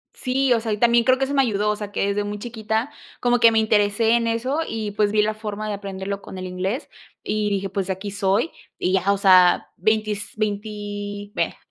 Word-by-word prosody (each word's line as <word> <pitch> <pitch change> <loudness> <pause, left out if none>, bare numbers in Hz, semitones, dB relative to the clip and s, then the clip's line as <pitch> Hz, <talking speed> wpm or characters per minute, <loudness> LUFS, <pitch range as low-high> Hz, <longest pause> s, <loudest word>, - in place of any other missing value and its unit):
Sí, 260 0 +1
o 235 - +2
sea, 225 -1 -3
y 210 - 0
también 235 +1 +4
creo 255 0 +4
que 270 - -1
eso 275 - -4
me 275 - +4
ayudó, 210 -4 0
o - - -1
sea, 205 -1 -7
que 200 - 0
desde 205 +1 0
muy 205 0 -4
chiquita 220 +3 -3 0.3
como 245 0 +2
que 230 -1 +7
me 225 - +1
interesé 215 0 +2
en 235 0 +2
eso 245 +6 -1
y 220 -2 -3
pues 205 0 +1
vi 210 0 +3
la 215 +1 0
forma 215 -1 -5
de 210 - -2
aprenderlo 200 0 -5
con 190 - -9
el 185 - -5
inglés 185 - -3 0.4
y 210 -1 -1
dije: 195 -1 -1
“Pues 195 -1 -3
de 190 - 0
aquí 195 +2 -7
soy” 200 +8 +1 0.3
y 185 - 0
ya. 190 +1 +2
O 200 - +1
sea, 185 -2 +5
veintis 215 +1 -1
veinti 205 -1 -4
vaya - - -1
210 Hz, 230 wpm, -22 LUFS, 200-225 Hz, 0.4 s, que